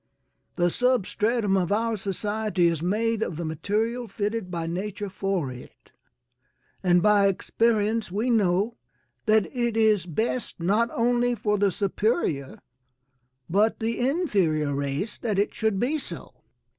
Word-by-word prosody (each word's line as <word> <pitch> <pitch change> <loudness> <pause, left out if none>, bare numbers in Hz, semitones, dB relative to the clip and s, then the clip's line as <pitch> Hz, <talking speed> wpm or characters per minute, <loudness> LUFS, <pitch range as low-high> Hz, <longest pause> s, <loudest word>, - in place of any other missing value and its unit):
The 175 -1 +2
substratum 230 -3 +1
of 180 -2 0
our 225 +2 +1
society 205 -1 -1
is 165 -2 +1
made 220 +5 0
of 170 - -2
the 170 - -3
material 220 +9 -1
fitted 210 0 -3
by 170 -2 -3
nature 200 +4 -4
for 190 -8 -2
it, 125 0 -13 0.9
and 175 -2 +3
by 205 -1 +5
experience 220 +1 +1
we 220 +6 0
know 205 +1 +2 0.5
that 215 -2 +4
it 235 -2 0
is 215 -5 +3
best 220 +8 -2
not 210 +7 +2
only 245 +1 +1
for 210 -2 0
the 200 -1 +3
superior, 195 - -1 0.9
but 210 +6 +2
the 225 +1 -2
inferior 200 - +1
race 140 +8 -3
that 215 -4 -1
it 200 - +1
should 220 -3 0
be 285 +7 0
so. - - -8
210 Hz, 135 wpm, -26 LUFS, 180-230 Hz, 0.9 s, by